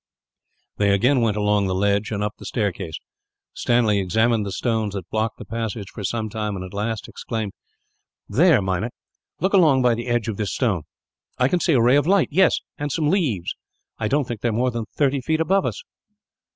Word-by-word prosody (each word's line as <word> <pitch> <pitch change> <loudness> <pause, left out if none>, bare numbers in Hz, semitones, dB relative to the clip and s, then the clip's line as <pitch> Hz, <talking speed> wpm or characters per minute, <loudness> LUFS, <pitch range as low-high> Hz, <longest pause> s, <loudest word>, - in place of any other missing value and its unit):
They 100 -1 +2
again 125 +6 +3
went 110 -3 +1
along 105 -1 +2
the 95 - -1
ledge, 100 +2 +1
and 105 -1 -2
up 105 0 -2
the - - -10
staircase. 95 -8 -2 0.6
Stanley 115 -4 +2
examined 110 +3 +1
the - - -4
stones 110 -1 -1
that 95 -3 -5
blocked 110 +1 -1
the - - -9
passage, 115 -3 -4
for 105 - -7
some 110 +2 -2
time, 105 -1 -3
and 95 -1 -5
at 95 - -11
last 105 +2 -3
exclaimed: 110 -4 -4 0.8
"There, - - +4
Meinik, 95 +5 -2 0.5
look 190 +3 +1
along 155 -9 +5
by 120 -1 +4
the 120 +2 -4
side 120 -1 0
of 110 -3 -3
this 105 -3 -2
stone. 100 - 0 0.5
I 125 - +3
can 180 +6 +1
see 170 - +2
a 125 - +4
ray 125 +4 +5
of 145 +1 +1
light. 195 -1 +3
Yes, 185 +2 +3 0.2
and 145 0 -2
some 150 -1 +1
leaves. 135 - 0 0.5
I 110 - 0
don't 140 +2 +1
think 120 -4 -5
they 120 - +1
are - - -2
more 125 +3 +1
than 115 -2 -3
thirty 140 -2 +2
feet 160 +5 0
above 190 +4 +2
us!" - - -5
115 Hz, 205 wpm, -22 LUFS, 105-130 Hz, 0.8 s, along